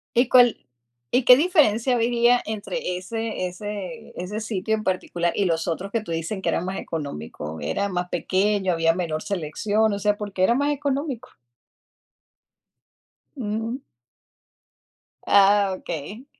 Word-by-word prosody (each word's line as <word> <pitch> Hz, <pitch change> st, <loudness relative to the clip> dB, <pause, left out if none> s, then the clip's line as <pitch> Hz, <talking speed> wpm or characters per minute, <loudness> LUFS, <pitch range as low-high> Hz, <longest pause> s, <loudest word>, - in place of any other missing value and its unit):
¿Y 240 Hz, +1 st, +4 dB
cuál 245 Hz, -2 st, +6 dB, 0.5 s
y 250 Hz, -, +2 dB
qué 250 Hz, -, +10 dB
diferencia 270 Hz, -, +3 dB
había 240 Hz, +1 st, +3 dB
entre 200 Hz, -4 st, -3 dB
ese 220 Hz, 0 st, -3 dB
ese 205 Hz, +4 st, -7 dB
ese 190 Hz, +4 st, -4 dB
sitio 220 Hz, 0 st, -1 dB
en 215 Hz, -, -5 dB
particular 175 Hz, -2 st, -1 dB
y 200 Hz, -, +1 dB
los 165 Hz, -1 st, 0 dB
otros 180 Hz, +4 st, -3 dB
que 230 Hz, -, 0 dB
tú 185 Hz, -, -8 dB
dices 165 Hz, +5 st, -3 dB
que -, -, 0 dB
eran 175 Hz, -, -1 dB
más 190 Hz, +1 st, -3 dB
económico? 80 Hz, -, -6 dB
¿Era 200 Hz, 0 st, -1 dB
más 180 Hz, -1 st, -3 dB
pequeño, 190 Hz, +2 st, +1 dB
había 165 Hz, 0 st, +2 dB
menor 165 Hz, -4 st, -2 dB
selección? 205 Hz, +5 st, 0 dB
O 200 Hz, -, -3 dB
sea, 205 Hz, 0 st, +1 dB
¿por 205 Hz, -1 st, -6 dB
qué 185 Hz, -, 0 dB
era 235 Hz, +5 st, +4 dB
más 285 Hz, +3 st, +1 dB
económico? 280 Hz, -3 st, -3 dB, 2.1 s
Mm. 225 Hz, +1 st, -3 dB, 1.5 s
Ah, 200 Hz, 0 st, +5 dB
okey. 185 Hz, -, -7 dB
205 Hz, 145 wpm, -24 LUFS, 180-230 Hz, 2.1 s, qué